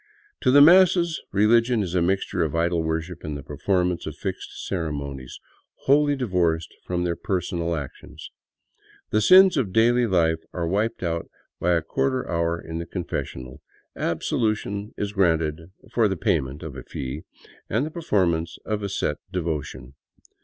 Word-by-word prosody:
To 130 - +2
the 140 +2 +7
masses, 170 0 +5
religion 115 +3 +3
is 90 -2 -5
a 90 - +2
mixture 95 +1 0
of 80 -1 -2
idol 85 0 +1
worship 80 +2 -3
and 75 -1 -4
the 70 - -9
performance 90 +4 -1
of - - -5
fixed - - -6
ceremonies, 70 -7 -4 0.5
wholly 145 +1 +4
divorced 90 -10 0
from 90 -1 -1
their 85 -1 -1
personal 85 -3 -2
actions. 70 -4 -8 0.8
The 110 - +2
sins 185 - +7
of 115 -9 0
daily 120 +3 +3
life 80 -4 +2
are 85 -2 -2
wiped 105 +4 -1
out 85 -1 -2 0.3
by 90 +1 +2
a 85 -2 +1
quarter 130 +8 -1
hour 85 0 0
in 80 0 -6
the 85 - -6
confessional; 65 -7 -5 0.3
absolution 105 +3 -1
is 100 0 -3
granted 80 -4 +1 0.2
for 115 -3 +3
the 95 -2 -2
payment 70 -4 -1
of - - -7
a - - -7
fee 65 +3 -6 0.5
and 115 +7 +1
the 155 - -6
performance 90 - 0
of 105 -1 -2
a 100 - -3
set 75 -6 -1
devotion. 75 -7 -4
90 Hz, 155 wpm, -24 LUFS, 80-110 Hz, 0.8 s, the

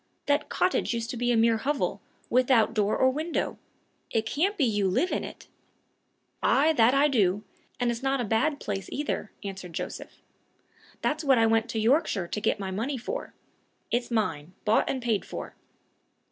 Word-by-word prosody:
That 285 0 +1
cottage 360 -9 +1
used 230 0 -3
to - - -5
be 245 +1 +1
a 235 - +3
mere 225 0 +4
hovel, 280 +5 -1 0.3
without 250 -3 +3
door 210 -2 +1
or 260 - +4
window! 310 +5 -2 0.5
It 220 -1 0
can't 355 - 0
be 295 - +2
you 205 -4 +1
live 310 - +1
in - - -1
it?" - - -9 0.9
"Ay, 305 +4 +4
that 245 -1 +4
I 285 +2 +5
do! 205 -7 +2 0.4
and 245 -1 +2
it's 235 +1 -4
not 270 0 +1
a 245 - 0
bad 230 +8 +1
place 195 -2 -4
either," 285 -7 -3
answered 190 -3 -7
Joseph. - - -6 0.9
"That's 310 +1 0
what 270 -3 +4
I 225 - +5
went 225 +1 +2
to 225 - -2
Yorkshire 220 - +2
to 210 - -3
get 205 - +1
my 190 -1 -4
money 235 +8 -2
for. 425 - -5 0.6
It's 240 +1 0
mine 185 -8 -1
bought 215 +1 +3
and 260 -2 -2
paid 225 -4 +1
for." - - -7
235 Hz, 180 wpm, -27 LUFS, 215-275 Hz, 0.9 s, I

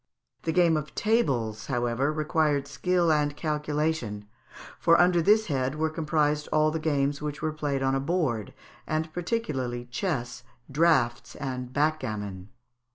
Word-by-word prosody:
The 165 - -1
game 170 -2 +4
of 150 0 -6
Tables, 130 - 0
however, 125 +2 0
required 150 -2 +1
skill 175 +3 +1
and 145 -1 +1
calculation, 150 -8 -2 0.5
for 170 0 +5
under 175 -1 +4
this 215 +5 +4
head 135 -5 -1
were 155 +1 0
comprised 150 -1 0
all 155 0 +3
the 160 - -2
games 145 -2 0
which 150 +1 -5
were 155 -1 0
played 145 -3 -2
on 135 0 +2
a 135 - +1
board, 135 - -1 0.3
and 155 +1 -2
particularly 145 - -2
chess, 125 -6 -2 0.3
draughts, 150 -5 +2
and 125 -3 -5
backgammon. 105 -11 -2
150 Hz, 140 wpm, -27 LUFS, 130-160 Hz, 0.5 s, for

